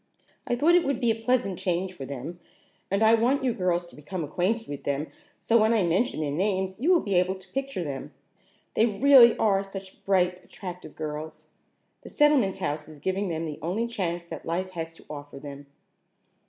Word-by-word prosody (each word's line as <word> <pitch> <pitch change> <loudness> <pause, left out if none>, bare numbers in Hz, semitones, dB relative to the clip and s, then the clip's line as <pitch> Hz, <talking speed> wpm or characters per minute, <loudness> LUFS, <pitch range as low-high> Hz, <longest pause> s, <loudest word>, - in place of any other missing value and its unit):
I 245 - +1
thought 305 +7 +4
it 350 -1 +5
would 275 -3 -1
be 240 -3 +3
a 225 0 -4
pleasant 245 -7 +1
change 185 +1 -1
for 140 -7 -7
them, 140 +6 -6 0.5
and 200 +3 +1
I 220 +1 +6
want 245 +5 +3
you 250 -2 +1
girls 175 -3 0
to 175 - -15
become 160 +4 -5
acquainted 190 +9 -1
with 145 -1 -6
them 140 +1 -1 0.3
so 230 -1 +3
when 220 +2 +4
I 210 - +3
mention 175 +1 +1
their 145 -2 -1
names 190 +3 -1
you 310 +9 +3
will 355 - +5
be 200 - -2
able 180 +1 +2
to 190 0 -15
picture 270 -8 -2
them. 140 -4 -5 0.6
They 225 - +4
really 240 +2 +7
are 195 -3 +3
such 195 -1 -10
bright, 180 -2 +1
attractive 180 -3 -9
girls! 155 0 -6 0.6
The - - -11
Settlement 280 -11 +3
House 150 -5 -3
is 155 -1 -11
giving 190 +5 -1
them 165 0 -2
the 150 -2 -6
only 190 +8 -1
chance 175 -7 -3
that - - -8
life 185 +3 -2
has 165 -2 -5
to - - -17
offer 145 -1 -8
them." 140 0 -9
185 Hz, 200 wpm, -27 LUFS, 165-225 Hz, 0.6 s, really